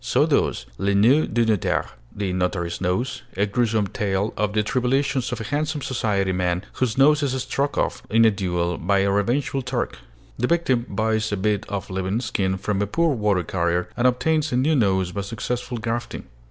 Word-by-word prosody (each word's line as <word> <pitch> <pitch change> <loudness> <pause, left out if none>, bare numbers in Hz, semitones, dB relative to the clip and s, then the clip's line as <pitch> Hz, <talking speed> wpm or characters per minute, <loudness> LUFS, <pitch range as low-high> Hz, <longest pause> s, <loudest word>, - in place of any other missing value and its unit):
So - - +3
does - - +1
'Le 100 0 +1
Nez 125 +10 +4
du 115 +1 +1
Notaire' 110 -4 0 0.2
(The 100 -3 -2
Notary's 90 -1 -2
Nose), 95 +7 -1 0.2
a 100 - +3
gruesome 110 0 +1
tale 100 +1 -1
of 105 -1 -1
the 105 0 +2
tribulations 130 +2 0
of - - -3
a - - -4
handsome 145 +3 -2
society 100 -6 0
man, 90 +1 -1
whose 125 -2 -1
nose 150 +2 +5
is 130 -2 0
struck 140 +2 -1
off - - 0
in 115 +2 +5
a 110 - +6
duel 90 -3 -1
by 100 +3 +2
a 100 0 +2
revengeful 125 +7 0
Turk. 125 -1 -3 0.4
The 125 - +1
victim 130 -8 +1
buys 110 +1 0
a 105 - -1
bit 105 +1 -1
of 100 -2 -4
living 95 +3 -1
skin 95 -5 -1
from 100 +1 -1
a 105 - 0
poor 165 - +1
water 105 -6 +1
carrier, 85 0 -1
and 125 +1 +3
obtains 155 +4 +1
a 125 - +1
new 150 +5 +2
nose 95 -7 +2
by 100 - -3
successful 120 +4 -4
grafting. 115 +1 -3
110 Hz, 195 wpm, -23 LUFS, 95-125 Hz, 0.4 s, a